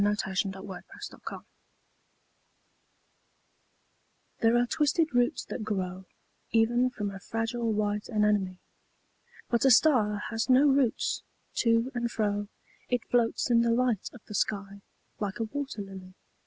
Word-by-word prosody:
DiqllzodbvCoOgle 195 -2 -1 0.2
STAR - - -8
SONG - - -9 3.0
These 225 - +5
are 240 +1 +4
twisted 305 +3 +1
roots 245 0 +1
that - - -5
grow 190 -3 -3 0.4
Even 240 +2 +3
from 210 -5 -4
a 195 - -8
fragile 225 +2 -2
white 210 -1 -1
anemone. 210 -4 +1 0.9
'But 235 - +2
a 270 - +6
star 225 -6 +4
has 225 +2 -1
no 260 +3 +6
roots: 270 -4 +2 0.4
to 230 +2 +2
and 240 -1 -1
fro 205 -1 -1 0.4
It 245 -2 0
floats 240 +1 +2
in 235 -1 +5
the 235 - +2
light 235 -3 +1
of 245 - -13
the - - -9
sky, 200 -1 -2 0.4
like 205 -1 -3
a - - +1
wat«r 265 -2 -4
]ily. 190 -1 -11
225 Hz, 130 wpm, -29 LUFS, 205-245 Hz, 3.0 s, a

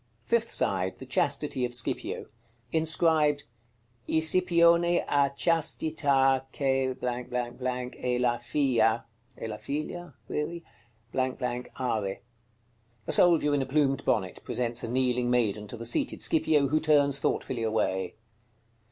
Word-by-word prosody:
Fifth 230 -1 +1
side. 95 -1 0
The - - -9
chastity 130 - 0
of 120 0 -1
Scipio. 120 - -2 0.5
Inscribed: 160 -2 +2 0.7
"ISIPIONE 170 +1 +4 0.2
A 140 -1 +2
CHASTITA 140 -5 +2
CH - - -16
E 125 -1 -2
LA 120 -1 +2
FIA 120 -3 +1 0.3
(e - - -4
la 105 -1 -5
figlia?) 165 +5 -5 1.6
ARE." 110 -6 -1 0.9
A - - -2
soldier 165 -4 +5
in 145 - +2
a - - -1
plumed 135 -1 +1
bonnet 95 -1 -1
presents 120 -1 -2
a - - -3
kneeling 125 0 0
maiden 110 -4 +1
to 120 - -7
the 115 - -7
seated 120 - -1
Scipio, 150 -3 +2
who 155 +2 +2
turns 145 -3 +3
thoughtfully 125 -2 -1
away. 100 -4 -1
130 Hz, 115 wpm, -28 LUFS, 120-150 Hz, 1.6 s, soldier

